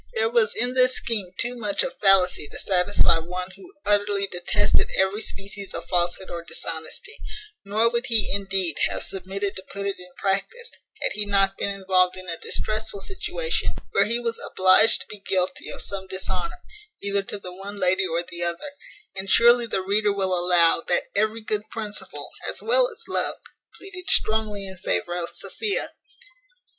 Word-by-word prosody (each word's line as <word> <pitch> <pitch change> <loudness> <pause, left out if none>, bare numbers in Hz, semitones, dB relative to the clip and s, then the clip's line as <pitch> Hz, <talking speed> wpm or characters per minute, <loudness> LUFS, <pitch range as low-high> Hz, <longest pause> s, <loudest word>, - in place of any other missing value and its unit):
There 225 +1 +1
was 225 -3 +2
in 245 +1 +1
this 255 0 +4
scheme 205 -6 -1
too 245 +1 -1
much 210 -4 -1
of 265 - -4
fallacy 190 -6 +4
to - - -10
satisfy 180 -2 +2
one 180 +3 -6
who 365 -1 -15
utterly 205 -1 +3
detested 175 -2 +1
every 190 +3 +1
species 200 -1 -3
of 165 0 -4
falshood 175 +1 0
or 170 -1 -5
dishonesty: 165 - -5 0.5
nor 210 +3 +1
would 235 +2 -1
he, 225 -4 +2
indeed, 195 -5 +1
have - - -4
submitted 195 +2 -3
to 190 - -8
put 200 0 -4
it 200 -1 -3
in 180 0 -13
practice, 200 - -2 0.3
had - - +1
he 210 - -1
not 195 -1 +2
been - - -2
involved 185 -2 +1
in 185 0 -6
a 165 -1 -3
distressful 215 -1 -3
situation, 425 - -2 0.2
where 200 - +3
he 230 +3 0
was 230 -1 -2
obliged 190 +4 +4
to - - -11
be 210 - -10
guilty 185 -2 -1
of - - -7
some 195 -1 -2
dishonour, 335 - -3 0.4
either 200 0 0
to 195 - -7
the 180 -2 -9
one 195 +2 -8
lady 190 -1 +2
or 170 0 -1
the 175 0 -6
other; 175 - -2 0.4
and 190 0 -6
surely 240 +2 +5
the 190 - -2
reader 205 +2 +1
will 195 -2 0
allow, 175 -2 +5
that 175 - +3
every 215 +2 0
good 215 0 -1
principle, 215 -2 -4 0.2
as - - -2
well - - +3
as 460 -1 -10
love, - - +5 0.4
pleaded 365 -2 -6
strongly 215 -2 +3
in 190 0 -7
favour 90 - -2
of 170 -1 -3
Sophia. 425 -3 -1
200 Hz, 175 wpm, -24 LUFS, 185-220 Hz, 0.5 s, surely